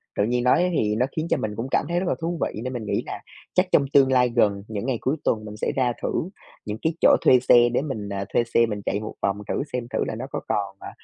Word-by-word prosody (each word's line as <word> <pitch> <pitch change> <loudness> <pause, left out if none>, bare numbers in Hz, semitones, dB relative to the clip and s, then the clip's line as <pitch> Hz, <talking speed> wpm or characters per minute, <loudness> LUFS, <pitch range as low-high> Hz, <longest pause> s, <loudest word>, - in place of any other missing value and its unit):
Tự 100 - +1
nhiên 120 +2 0
nói 175 +8 +3
thì 105 -3 +1
nó 125 - +2
khiến 160 +1 -2
cho - - +2
mình 105 -1 -3
cũng 115 +4 -4
cảm - - +2
thấy 175 +1 +1
rất 190 - -2
là - - +1
thú 170 0 -2
vị, 110 - -2
nên 130 +1 -4
mình 115 -3 -5
nghĩ - - -1
nà - - -6 0.3
chắc 180 +1 +3
trong 140 - +4
tương 135 -2 +5
lai 125 -1 +4
gần, 105 -4 +1
những 110 +1 -4
ngày 130 -3 0
cuối 135 +4 0
tuần 110 -1 0
mình 105 0 -8
sẽ - - -1
ra 125 -2 +1
thử 180 - -2 0.4
những 105 0 -4
cái 160 0 0
chỗ - - +7
thuê 130 - +6
xe 120 -1 +5
để 125 - +2
mình, 110 -9 -5
ờ, 100 0 -3
thuê 120 - +3
xe 115 0 +2
mình 105 -2 -4
chạy 100 - 0
một 110 - -6
vòng 100 +1 0
thử - - 0
xem. 125 - -1
Thử - - +1
là - - -3
nó 120 - -5
có - - -2
còn, 100 -2 -2
ờ, - - -8
120 Hz, 295 wpm, -24 LUFS, 105-130 Hz, 0.4 s, chỗ